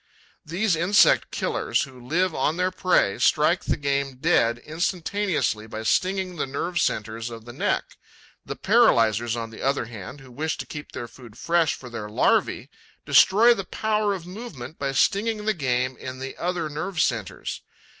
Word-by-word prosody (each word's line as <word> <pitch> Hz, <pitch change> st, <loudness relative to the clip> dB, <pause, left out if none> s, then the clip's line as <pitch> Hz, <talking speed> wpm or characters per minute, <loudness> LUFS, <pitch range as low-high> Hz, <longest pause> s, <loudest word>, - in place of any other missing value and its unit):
These 180 Hz, +4 st, 0 dB
insect 185 Hz, +5 st, +4 dB
killers, -, -, -1 dB
who 130 Hz, -2 st, -11 dB
live 175 Hz, +7 st, 0 dB
on 150 Hz, +4 st, 0 dB
their 185 Hz, +1 st, +1 dB
prey, 180 Hz, -, +2 dB
strike -, -, +3 dB
the -, -, 0 dB
game 140 Hz, -1 st, -1 dB
dead 115 Hz, -2 st, +2 dB
instantaneously 165 Hz, -, -1 dB
by 110 Hz, 0 st, -6 dB
stinging 185 Hz, +7 st, 0 dB
the 145 Hz, -, -1 dB
nerve 170 Hz, +6 st, -2 dB
centres 110 Hz, +2 st, -2 dB
of 115 Hz, -1 st, -10 dB
the 120 Hz, -, -9 dB
neck; -, -, -2 dB, 0.5 s
the -, -, -6 dB
paralyzers, 115 Hz, 0 st, +3 dB
on 115 Hz, -1 st, -5 dB
the 110 Hz, -, -10 dB
other 135 Hz, -2 st, 0 dB
hand, 115 Hz, +4 st, -9 dB
who 135 Hz, -2 st, -14 dB
wish 155 Hz, +6 st, -2 dB
to -, -, -5 dB
keep 150 Hz, -2 st, -8 dB
the 120 Hz, -, -5 dB
food 120 Hz, -3 st, -15 dB
fresh 165 Hz, +1 st, +1 dB
for 130 Hz, -, -11 dB
their 110 Hz, -3 st, -6 dB
larvae, 105 Hz, -, +1 dB, 0.3 s
destroy 230 Hz, +5 st, +6 dB
the 195 Hz, -, -4 dB
power 210 Hz, +1 st, 0 dB
of 175 Hz, -3 st, -8 dB
movement 175 Hz, -, -9 dB
by 140 Hz, -1 st, -1 dB
stinging 210 Hz, +9 st, +1 dB
the 215 Hz, -, +2 dB
game 130 Hz, -5 st, -1 dB
in 130 Hz, 0 st, -7 dB
the 135 Hz, +1 st, -6 dB
other 175 Hz, -2 st, -2 dB
nerve 160 Hz, +4 st, -4 dB
centres. 115 Hz, -9 st, -2 dB
145 Hz, 170 wpm, -24 LUFS, 120-185 Hz, 0.5 s, destroy